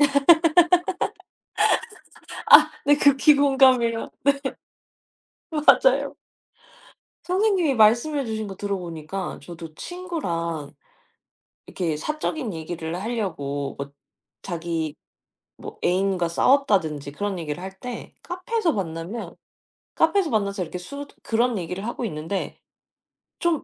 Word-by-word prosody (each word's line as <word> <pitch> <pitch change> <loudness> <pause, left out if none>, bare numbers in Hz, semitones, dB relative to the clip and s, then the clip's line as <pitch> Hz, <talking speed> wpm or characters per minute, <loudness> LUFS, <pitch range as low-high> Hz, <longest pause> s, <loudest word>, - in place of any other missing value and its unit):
아 290 - +7 2.8
네. 290 0 +6
극히 285 +1 +5
공감해요. 260 -5 +3 1.2
네. 310 -2 -6
맞아요. - - +4 1.1
선생님이 370 -6 +2
말씀해 240 +6 +3
주신 220 -1 -3
거 195 -1 -8
들어 200 -1 -2
보니까 170 +2 -6
저도 165 0 -10
친구랑 170 - -4 0.9
이렇게 165 -4 -2
사적인 305 - -3
얘기를 160 +1 -5
하려고 160 - -3
엇 140 - -4
뭐 - - -36 0.5
자기 165 -3 -3 0.6
뭐 - - -9
애인과 185 -1 +1
싸웠다든지 170 - +2
그런 200 +4 -3
얘기를 150 +1 -5
할 190 +1 -8
때 250 -1 -7
카페에서 360 +1 -1
만나면 180 - -5 0.6
카페에서 345 +2 +2
만나서 200 -4 0
이렇게 175 +2 -5
숟 280 +11 -8 0.2
그런 235 0 +1
얘기를 180 +3 -4
하고 240 +1 -4
있는데 165 +1 -4 0.8
좀 340 -3 +1
200 Hz, 235 characters per minute, -24 LUFS, 170-280 Hz, 2.8 s, 아